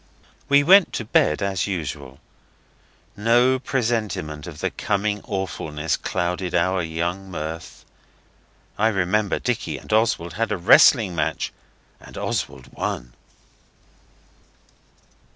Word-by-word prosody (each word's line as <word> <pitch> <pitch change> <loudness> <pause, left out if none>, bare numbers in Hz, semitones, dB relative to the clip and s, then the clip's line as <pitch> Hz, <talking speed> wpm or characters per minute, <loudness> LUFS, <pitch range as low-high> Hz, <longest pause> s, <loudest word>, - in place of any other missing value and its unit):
We 140 0 +5
went 190 +4 +6
to 115 - -3
bed 85 -4 +2
as 95 -2 -1
usual. 70 -7 -5 1.0
No 120 +4 +3
presentiment 110 - -2
of 80 -4 -9
the - - -1
coming 105 0 -1
awfulness 80 -7 -3
clouded 90 +1 -2
our 95 +2 +2
young 85 +4 -3
mirth. 80 -1 -7 0.9
I 110 - +4
remember 100 0 +1
Dicky - - -2
and - - -6
Oswald 110 -6 +1
had 115 0 -2
a 105 - 0
wrestling 100 +2 +6
match, 80 0 -2 0.5
and - - -13
Oswald - - -4
won. - - -4
95 Hz, 110 wpm, -23 LUFS, 80-110 Hz, 1.0 s, went